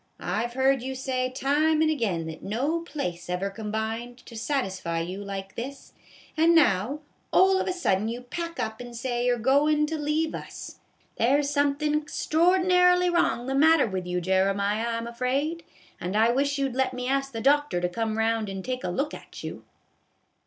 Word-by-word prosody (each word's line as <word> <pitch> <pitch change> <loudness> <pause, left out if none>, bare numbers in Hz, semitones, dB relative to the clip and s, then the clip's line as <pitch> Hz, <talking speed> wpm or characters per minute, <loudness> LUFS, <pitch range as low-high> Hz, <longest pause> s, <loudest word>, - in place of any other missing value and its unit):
I 225 +3 -1
've 240 - -13
heard 265 0 +3
you 265 +1 -4
say 255 -1 -1
time 295 +4 +1
and 315 0 +3
ag'in 200 - -1
that 160 0 -7
no 270 +11 -1
place 180 - -5
ever 185 +2 -1
combined 220 +3 -4
to 230 - -11
satisfy 190 - -2
you 185 +4 -5
like 195 -1 -6
this, 270 +4 -7 0.4
and 330 +2 +4
now, 275 - +3 0.3
all 380 0 +5
of - - -3
a - - +1
sudden, 215 - 0
you 235 +2 -4
pack 335 +5 -6
up 220 -1 -3
and 240 -1 -9
say 245 0 -1
you 245 - +3
're - - -8
goin' 290 +5 +3
to 315 +1 -3
leave 305 +2 0
us. - - -8 0.4
There 275 +5 +3
's 280 - -2
somethin' 290 +1 +1
extraordinarily 360 +4 +3
wrong 340 -8 +1
the 265 - -2
matter 315 +2 +5
with 190 -4 -4
you, 180 0 -1
Jeremiah, 195 +4 +1
I 230 -1 -1
'm 230 - -4
afraid, 270 +8 -2 0.4
and 185 +4 -2
I 225 +2 +5
wish 280 +3 +1
you 275 -1 +1
'd 255 - -7
let 260 -1 0
me 250 0 -4
ask 275 +1 0
the 225 - -5
doctor 285 -5 +2
to 180 - 0
come 220 +4 -2
'round 225 -1 +1
and 195 -1 -6
take 255 0 -3
a 180 - -1
look 275 +12 -2
at - - -10
you." - - -7
255 Hz, 195 wpm, -26 LUFS, 220-295 Hz, 0.4 s, all